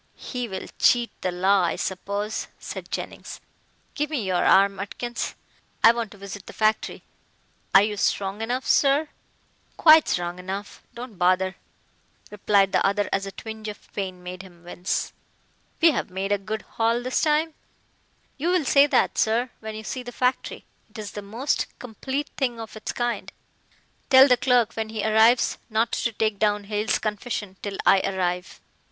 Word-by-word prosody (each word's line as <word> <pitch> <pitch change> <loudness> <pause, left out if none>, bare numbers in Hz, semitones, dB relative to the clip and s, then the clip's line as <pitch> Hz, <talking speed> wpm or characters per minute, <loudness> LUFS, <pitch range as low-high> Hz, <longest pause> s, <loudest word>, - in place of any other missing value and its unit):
"He 245 -2 -5
will 190 -3 -6
cheat 240 -1 +4
the 185 - -1
law, 190 +2 +3
I 175 - 0
suppose," 200 +3 -3
said - - -8
Jennings, - - -6 0.5
"give 295 -1 -2
me 285 -8 -2
your 185 -2 0
arm, 195 0 +4
Atkins. 240 +4 -4 0.5
I 230 - +9
want 235 -2 -3
to 205 - -14
visit 200 0 -9
the - - -9
factory." 215 0 0 0.7
"Are 195 - +9
you 210 0 -1
strong 195 +1 -1
enough, 245 +3 -2
sir?" 285 +2 +3 0.7
"Quite 315 -1 +7
strong 175 0 -2
enough. 195 +3 -6
Don't 235 -5 -9
bother," 185 +1 +2 0.8
replied 200 -1 +2
the - - +2
other 200 +1 +1
as 195 0 0
a - - -5
twinge 220 +1 -8
of 210 -1 -9
pain 185 -3 -5
made 180 +1 -7
him 175 -3 -16
wince. 175 +1 -3 0.7
"We've 325 -9 +4
made 190 +2 -3
a 205 - +2
good 215 +2 -5
haul 230 +1 0
this 255 +1 0
time." 310 +1 +2 0.9
"You'll 345 +1 +1
say 280 +2 +5
that, - - +2
sir, 235 +3 +1
when 220 0 -7
you 220 - -7
see 255 +5 -4
the 245 0 -8
factory. 250 +1 -1 0.2
It - - -13
is 210 -2 -6
the 205 - -6
most 230 +8 -1
complete 265 +5 -4
thing 245 -4 -1
of 225 -1 -8
its 215 - -5
kind." 240 -1 -3 0.8
"Tell 265 0 +9
the 250 - +5
clerk 245 -2 +2
when 220 -1 -3
he 220 -1 -3
arrives 220 +3 +4
not 225 +1 +1
to 235 - -1
take 215 -2 -1
down 210 -1 +1
Hale's 210 +2 0
confession 210 -2 -4
till 200 -1 -5
I 195 - +6
arrive. 180 -2 -2
215 Hz, 170 wpm, -24 LUFS, 195-245 Hz, 0.9 s, I